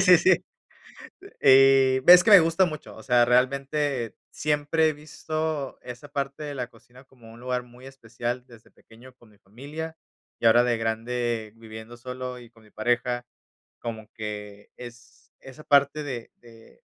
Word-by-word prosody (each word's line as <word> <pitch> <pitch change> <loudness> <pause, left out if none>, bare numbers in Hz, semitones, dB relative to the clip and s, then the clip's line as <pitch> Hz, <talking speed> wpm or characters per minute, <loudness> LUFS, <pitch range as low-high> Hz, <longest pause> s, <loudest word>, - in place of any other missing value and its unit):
Sí, 180 -2 +7
sí. 180 +1 +3 1.0
Eh, 135 -1 +5
ves 180 0 +9
que - - +2
me 200 - +11
gusta 165 +3 +2
mucho. 155 -2 -9
O - - -12
sea, 120 -2 +4
realmente, 135 0 0 0.2
siempre 150 +1 +1
he - - -3
visto, 155 -1 -5
esa 125 +3 -10
parte 140 +1 -4
de 145 -1 -5
la 125 -2 -4
cocina, 125 +1 -20
como 120 -4 -17
un 115 - -15
lugar 125 0 -3
muy 125 +2 -15
especial, 120 -1 -6
desde 115 -3 -18
pequeño 125 +3 -18
con 120 -3 -22
mi 105 - -24
familia. 145 +11 -8 0.4
Y - - -4
ahora 120 +2 +6
de 120 -1 0
grande, 115 0 -3
viviendo 110 +1 -11
solo 125 +1 -7
y 120 -1 -15
con 115 -1 -22
mi 110 - -21
pareja, 120 +2 -1 0.5
como 110 -2 -7
que 105 -2 -8
es, 120 +1 -14
esa 135 +3 -13
parte 140 +1 +3
de 125 -5 -6
de 115 -1 -19
125 Hz, 165 wpm, -25 LUFS, 120-145 Hz, 1.0 s, me